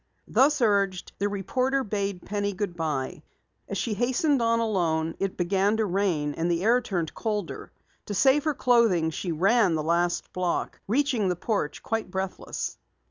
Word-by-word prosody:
Thus 285 +1 +3
urged, 200 -4 +1
the 205 +1 +1
reporter 255 +7 0
bade 200 -4 -3
Penny 205 0 -2
good 190 -2 -3
bye. 150 -6 -3 0.5
As - - -2
she 230 - -1
hastened 255 +5 +1
on 230 0 +2
alone, 165 -7 0
it 195 -1 -2
began 195 +4 +1
to 220 - +1
rain 175 -7 0
and 165 +3 -1
the 170 +1 0
air 240 +3 +4
turned 175 -8 -3
colder. 210 -6 -4 0.4
To 205 - -3
save 270 +8 +4
her 305 -2 +1
clothing, 225 -12 +3
she 175 +3 -3
ran 190 +2 +3
the 155 - -1
last 170 +2 0
block, 180 -2 -2
reaching 245 -3 +1
the 180 - 0
porch 190 -4 -2
quite 225 -3 -2
breathless. 190 0 -4
200 Hz, 165 wpm, -26 LUFS, 175-230 Hz, 0.5 s, air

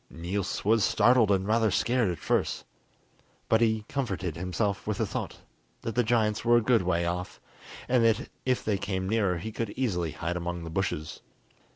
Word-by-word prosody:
Niels 90 +4 -3
was 110 0 +4
startled 115 +1 +4
and 95 -1 +2
rather 110 0 +3
scared 120 +2 +1
at 85 - -3
first, - - -1 0.8
but 110 0 +3
he 110 -2 +2
comforted 95 - -3
himself 95 +3 -2
with - - -1
the - - +1
thought - - -5 0.4
that 115 - -3
the 125 - +3
giants 110 -2 +1
were 120 0 +5
a - - +3
good 115 0 +3
way 85 -1 0
off, 90 +1 -4 0.5
and 125 -1 +3
that 115 -1 +2 0.2
if 130 -1 0
they 100 -3 0
came 95 -2 -2
nearer 100 -4 +1
he 110 +7 -5
could 115 0 -3
easily 90 - -1
hide 85 +1 -3
among 85 0 -4
the 80 - -7
bushes. 80 -4 -3
100 Hz, 185 wpm, -28 LUFS, 90-115 Hz, 0.8 s, were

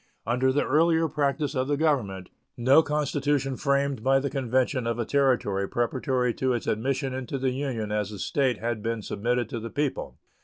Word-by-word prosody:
Under 125 +3 +2
the 145 - +1
earlier 165 +3 +3
practice 145 -1 -1
of 130 -2 -1
the 145 0 0
Government 110 - 0 0.3
no 130 +6 +6
constitution 145 -2 0
framed 140 -3 0
by 135 +1 +4
the 140 0 -3
convention 130 -1 0
of 115 -1 -1
a 120 - -1
Territory 120 -8 +1
preparatory 125 +1 0
to 130 +1 0
its 120 - -3
admission 130 +4 -1
into 130 +1 -4
the 130 -1 0
Union 125 -6 -3
as 105 -1 -1
a 105 - -7
State 130 +3 0
had 115 -1 -3
been 115 0 -3
submitted 120 +4 -1
to 120 - -4
the 115 +1 -6
people. 145 +1 -3
130 Hz, 185 wpm, -26 LUFS, 115-140 Hz, 0.3 s, no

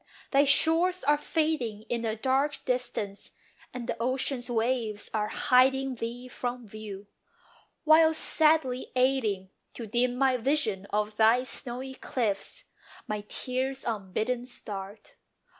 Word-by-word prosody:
Thy 280 +1 +5
shores 330 +6 +4
are 295 +2 +4
fading 295 -10 -1
In 235 +1 -3
the 220 -1 -1
dark 270 +5 0
distance, 245 -5 -3 0.4
and 250 -2 -6
the 235 -1 -2
ocean's 255 0 -1
waves 225 -3 -1
Are 210 -1 0
hiding 265 +3 +3
thee 240 +1 -6
from 245 -1 -5
view; 205 -1 -8 0.8
while, 315 0 +6
sadly 310 -5 +1
aiding 230 -8 +1 0.2
To 235 - -5
dim 245 +3 +1
my 260 0 +2
vision 230 -7 0
of 210 +1 -1
thy 225 +3 +5
snowy 260 0 -3
cliffs, 220 -7 -3 0.4
My 210 -1 -3
tears 260 +1 -3
unbidden 225 +3 -2
start. 205 -3 -8
250 Hz, 125 wpm, -28 LUFS, 215-265 Hz, 0.8 s, while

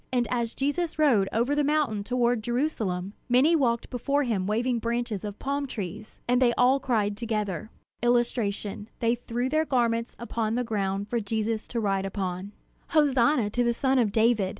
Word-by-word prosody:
And 245 -2 +1
as 235 -2 -1
Jesus 305 +5 -1
rode 240 -11 +3
over 240 +5 +1
the 295 0 +2
mountain 285 -8 +1
toward 245 0 +1
Jerusalem, 215 -7 -2 0.2
many 265 +7 +5
walked 235 -6 0
before 280 +4 0
him 205 -7 -1
waving 235 +3 0
branches 235 -3 -2
of 205 -1 -5
palm 280 +1 -2
trees. 215 -2 -7
And 245 +1 +3
they 240 -2 +4
all 255 +3 +4
cried 220 -6 0
together: 215 -2 -3 0.3
[Illustration: 225 -4 0
They 230 0 +2
threw 245 +1 -2
their 310 +3 +2
garments 235 -5 0
upon 230 -1 -2
the 250 - 0
ground 200 -3 -2
for 235 +2 -1
Jesus 220 +1 -2
to 235 - -3
ride 195 -2 0
upon] 190 0 -4 0.4
"Hosanna 270 -6 +3
to 245 +3 +1
the 235 0 +1
son 265 +1 +2
of 220 -4 +2
David! 220 -3 +3
235 Hz, 175 wpm, -27 LUFS, 210-255 Hz, 0.4 s, many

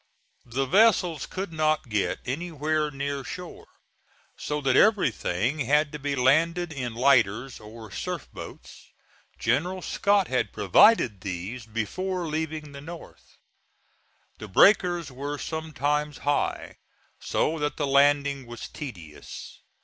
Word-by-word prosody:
The 130 +3 -1
vessels 180 - +3
could 190 -2 -5
not 155 -2 +1
get 100 -5 0
anywhere 155 +2 -1
near 140 0 -4
shore, 180 +5 -8 0.7
so 150 0 -3
that 130 -2 +2
everything 140 - +2
had 150 +3 +2
to 150 - -6
be 145 0 -2
landed 160 +6 +2
in 125 -5 -4
lighters 120 -1 +2
or 110 0 -11
surf - - -4
boats; - - -11 0.5
General 180 +5 0
Scott 200 -2 +2
had 125 -1 0
provided 105 - +4
these 100 +6 -5
before 175 - -3
leaving 155 -1 -3
the 140 0 -9
North. 165 +3 -12 1.0
The 110 - -7
breakers 175 - +4
were 140 +3 -5
sometimes 150 -1 -2
high, 145 0 -1 0.4
so 160 +1 0
that 150 0 -2
the 145 - 0
landing 140 -1 +3
was 120 -1 -7
tedious. 85 - -9
145 Hz, 120 wpm, -26 LUFS, 125-160 Hz, 1.0 s, provided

